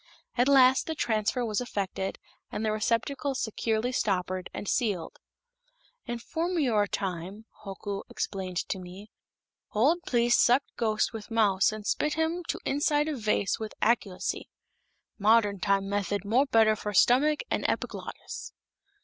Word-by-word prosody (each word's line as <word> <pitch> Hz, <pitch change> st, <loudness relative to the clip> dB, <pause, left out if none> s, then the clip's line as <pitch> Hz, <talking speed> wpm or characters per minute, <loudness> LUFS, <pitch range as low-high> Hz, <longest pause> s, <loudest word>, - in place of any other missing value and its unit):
At 245 Hz, +1 st, +3 dB
last 265 Hz, -1 st, +5 dB
the 320 Hz, -, -2 dB
transfer 230 Hz, -1 st, 0 dB
was 215 Hz, 0 st, -1 dB
effected 195 Hz, -5 st, -3 dB, 0.3 s
and 220 Hz, -, -3 dB
the 215 Hz, -, +1 dB
receptacle 235 Hz, +6 st, -1 dB
securely 225 Hz, 0 st, -1 dB
stoppered 185 Hz, -5 st, -1 dB
and 205 Hz, -, -6 dB
sealed. 200 Hz, -8 st, -1 dB, 0.9 s
"In 240 Hz, -, -2 dB
formeryore 280 Hz, -, 0 dB
time," 190 Hz, +2 st, -4 dB, 0.2 s
Hoku 200 Hz, 0 st, -5 dB
explained 185 Hz, -2 st, -4 dB
to 190 Hz, -, -2 dB
me, 185 Hz, +4 st, -11 dB, 0.6 s
"old 280 Hz, +11 st, +3 dB
pliests 240 Hz, -1 st, +3 dB
sucked 250 Hz, +3 st, +3 dB
ghost 215 Hz, -1 st, 0 dB
with 220 Hz, 0 st, -7 dB
mouth 210 Hz, -4 st, +3 dB
and 215 Hz, -1 st, -7 dB
spit 300 Hz, +6 st, 0 dB
him 325 Hz, +2 st, -1 dB
to -, -, -1 dB
inside 295 Hz, +1 st, +1 dB
of 290 Hz, -5 st, -3 dB
vase 210 Hz, -2 st, +1 dB
with 220 Hz, -1 st, -6 dB
acculacy. 215 Hz, -5 st, 0 dB, 0.7 s
Modern 210 Hz, -1 st, +4 dB
time 195 Hz, 0 st, +1 dB
method 200 Hz, 0 st, -1 dB
more 250 Hz, +7 st, +3 dB
better 220 Hz, -3 st, +4 dB
for 210 Hz, -1 st, -5 dB
stomach 290 Hz, +9 st, +4 dB
and -, -, 0 dB
epiglottis." -, -, -5 dB
220 Hz, 140 wpm, -28 LUFS, 200-255 Hz, 0.9 s, last